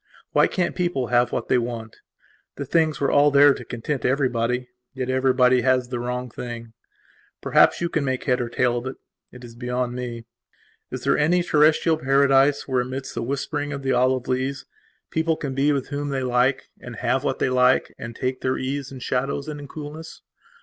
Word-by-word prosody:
Why - - +4
can't 180 -2 -1
people 175 -9 -1
have 120 0 +3
what - - -3
they 125 - +3
want? 115 -2 -5 0.6
The 140 - -5
things 155 0 +1
were 140 - +1
all 145 +1 +5
there 145 0 +6
to - - -8
content 125 +2 -4
everybody; 125 -2 0 0.3
yet 130 -1 -2
everybody 130 -1 +3
has 130 -1 +1
the 125 -1 -3
wrong 125 0 -4
thing. 115 -1 -7 0.7
Perhaps - - +3
you 170 - +1
can 160 -3 -1
make 130 -2 -2
head 125 -2 +1
or 120 - -3
tail 120 0 +1
of 125 - -7
it; 130 - -5 0.4
it 125 0 -13
is 120 -1 -10
beyond 125 +1 -3
me. 120 -2 -6 0.6
Is - - -6
there - - +2
any 175 +4 +3
terrestial 155 +1 +3
paradise 135 0 +3
where, 130 -2 +1
amidst 130 +2 -5
the - - -3
whispering 145 +3 -3
of 140 -1 -6
the 135 - 0
olive 130 0 +1
leaves, 130 +2 -2 0.5
people 160 0 0
can 140 -3 -4
be 140 +2 +2
with 140 -3 -2
whom 145 0 -3
they 135 -1 -2
like 125 +2 +1
and 125 -1 -9
have 125 +3 0
what 135 - -1
they - - 0
like 125 0 +3
and 115 0 -7
take 130 +1 -3
their 130 0 0
ease 135 +1 -4
in 135 - -8
shadows 135 +3 -2
and 150 -1 -5
in 145 - -9
coolness? 155 +2 -9
130 Hz, 200 wpm, -23 LUFS, 125-145 Hz, 0.7 s, there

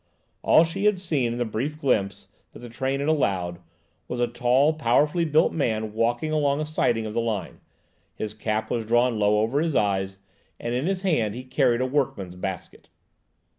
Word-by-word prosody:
All 160 - +6
she 195 +5 -3
had 210 -2 +4
seen 150 -10 -1
in 120 - -4
the 120 - 0
brief 130 +8 -3
glimpse 105 -9 0 0.3
that - - -11
the 120 - -9
train 135 +4 -2
had 140 - -2
allowed, 95 - 0 0.5
was 125 - -4
a 120 - +3
tall, 125 +5 +2
powerfully 150 +4 +2
built 155 0 +3
man 110 -7 -1
walking 120 +7 0
along 145 -2 +1
a 155 - -1
siding 120 -7 0
of 105 - -5
the 115 - 0
line. 110 -4 -3 0.6
His 105 -1 -5
cap 110 0 -2
was 115 -2 -1
drawn 120 +1 +2
low 105 0 +3
over 125 +7 +1
his 160 -3 -1
eyes, 95 -1 0 0.4
and 120 - -3
in 130 +6 -1
his 190 0 -2
hand 115 - +1
he 125 - -6
carried 130 -2 +1
a - - +1
workman's 130 -9 -2
basket. 95 0 -7
120 Hz, 190 wpm, -25 LUFS, 110-150 Hz, 0.6 s, All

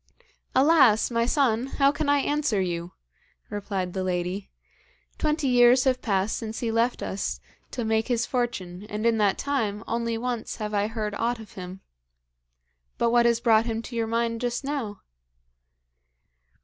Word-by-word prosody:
'Alas! 260 -6 +5
my 230 0 +1
son, 250 -3 +2
how 275 -1 +5
can 290 0 -2
I 285 - +5
answer 290 -6 0
you?' 175 -1 -3 0.6
replied 195 -3 -3
the 190 - -2
lady. 180 +2 -2 0.7
'Twenty 305 -2 0
years 245 0 +6
have 255 -2 +1
passed 200 -1 0
since 225 -1 -5
he 230 -2 -1
left 230 +2 +1
us 195 - -3 0.3
to 240 - -4
make 220 0 +1
his 235 -2 +1
fortune, 195 -8 -3
and, 210 +2 -3
in 230 -1 +3
that 205 -2 +2
time, 225 -7 -1
only 230 0 -1
once 240 -1 -3
have 210 -1 -5
I 205 0 +1
heard 215 -2 -3
aught 235 +3 -1
of 220 - -11
him. 185 0 -8 1.2
But 235 - +2
what 240 0 +5
has 235 -1 +2
brought 230 -1 +3
him 225 0 -2
to 240 - -8
your 230 -1 0
mind 230 0 -1
just 245 +1 -2
now?' 270 -8 -4
230 Hz, 160 wpm, -26 LUFS, 210-245 Hz, 1.2 s, years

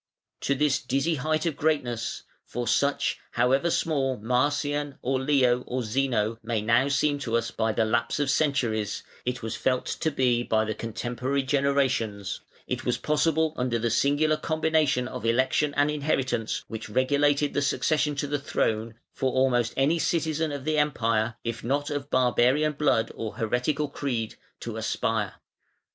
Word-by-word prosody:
To 140 - 0
this 145 0 +2
dizzy 135 +6 0
height 155 +2 -1
of 165 -4 0
greatness 135 -7 -1 0.2
for 120 0 -4
such, 140 +4 +1
however 135 +7 +2
small 135 -6 0
Marcian 145 +5 0
or 130 +1 0
Leo 130 -3 +3
or 125 0 -2
Zeno 115 -2 0
may 115 0 -1
now 115 +5 +3
seem 145 +1 +1
to 115 -4 0
us 115 - -2
by 110 0 0
the 110 +1 +1
lapse 115 +4 0
of 140 -2 +1
centuries, 120 -9 0 0.2
it 125 -1 -3
was 115 - -3
felt 130 -1 0
to 160 - -1
be 125 -4 +2
by 110 -2 +1
the 110 - -2
contemporary 125 +5 -2
generations 130 -7 0 0.2
it - - -3
was - - 0
possible 160 +1 +1
under 125 -2 0
the 115 0 -1
singular 145 +5 +2
combination 155 -5 +1
of 125 -2 -7
election 130 +5 +2
and 145 +1 +3
inheritance 135 -6 -1
which 110 -1 -7
regulated 140 +4 +2
the 145 - +1
succession 150 +1 +1
to 145 - -2
the 145 0 -1
throne, 115 -4 -1 0.2
for 130 -1 0
almost 125 -3 +2
any 145 +5 +3
citizen 160 -1 0
of 140 -1 -5
the 155 -1 +1
Empire, 115 -6 +1
if 115 -1 -4
not 145 +5 -1
of 145 -1 -3
barbarian 130 +5 +3
blood 140 -6 +1
or 110 -2 -5
heretical 125 +7 0
creed, 125 -6 -3 0.3
to - - -5
aspire. - - -1
135 Hz, 160 wpm, -26 LUFS, 120-145 Hz, 0.3 s, Leo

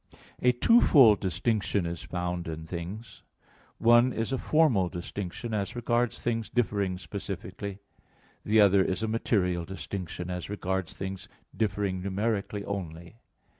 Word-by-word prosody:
A 125 - +5
twofold 125 - +6
distinction 100 0 0
is 85 0 -4
found 90 -1 -3
in 80 0 -5
things; 90 +7 -7 0.6
one 120 +2 +5
is 115 +1 -2
a 135 - 0
formal 130 - +3
distinction 95 +6 -5
as 100 0 -2
regards 120 0 0
things 115 -2 -2
differing 100 -6 0
specifically; 100 0 -6 0.7
the 110 +1 +3
other 100 -1 +6
is 95 +4 -2
a - - 0
material 95 -6 0
distinction 90 -1 -6
as 90 0 -5
regards 95 -3 -2
things 95 0 -6 0.3
differing 100 -3 -1
numerically 100 +1 -2
only. 85 0 -6
100 Hz, 130 wpm, -28 LUFS, 90-115 Hz, 0.7 s, twofold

